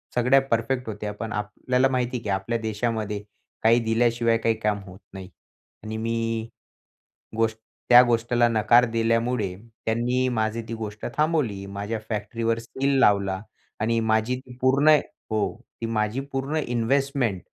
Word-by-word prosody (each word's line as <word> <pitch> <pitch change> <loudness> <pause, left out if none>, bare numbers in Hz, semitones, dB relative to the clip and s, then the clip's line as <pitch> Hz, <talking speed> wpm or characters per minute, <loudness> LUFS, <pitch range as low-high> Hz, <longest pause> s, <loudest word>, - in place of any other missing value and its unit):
सगळ्या 125 +3 +5
परफेक्ट 120 +2 0
होत्या. 105 0 -4
पण 110 +2 -6
आपल्याला 125 +5 0
माहिती 125 -1 -1
आहे, 115 - -9
की - - -4
आपल्या 100 +4 -1
देशामध्ये 110 -1 -2 0.4
काही 115 +2 +5
दिल्याशिवाय 115 0 +2
काही 115 0 +1
काम 105 -2 0
होत 95 -1 -13
नाही. 95 -1 -8 0.5
आणि 110 0 -5
मी 115 0 -2 0.9
गोष्ट 115 -1 +1 0.3
त्या 120 0 +10
गोष्टीला 120 0 +2
नकार 115 +2 +5
दिल्यामुळे, 115 -3 0 0.3
त्यांनी 120 +3 +1
माझी 110 -1 -1
ती - - -3
गोष्ट 105 -2 -6
थांबवली. 150 -11 0
माझ्या 100 +3 -4
फॅक्ट्रीवर 115 +1 -1
सील 135 +4 -1
लावला 100 -4 +3 0.4
आणि 115 +1 +1
माझी 110 +2 +1
ती 125 -1 -13
पूर्ण 140 +4 +5 0.3
हो, 110 -1 0 0.3
ती - - -1
माझी 110 +2 -1
पूर्ण 135 +3 -2
इन्व्हेस्टमेंट 120 -3 0
115 Hz, 140 wpm, -25 LUFS, 110-125 Hz, 0.9 s, त्या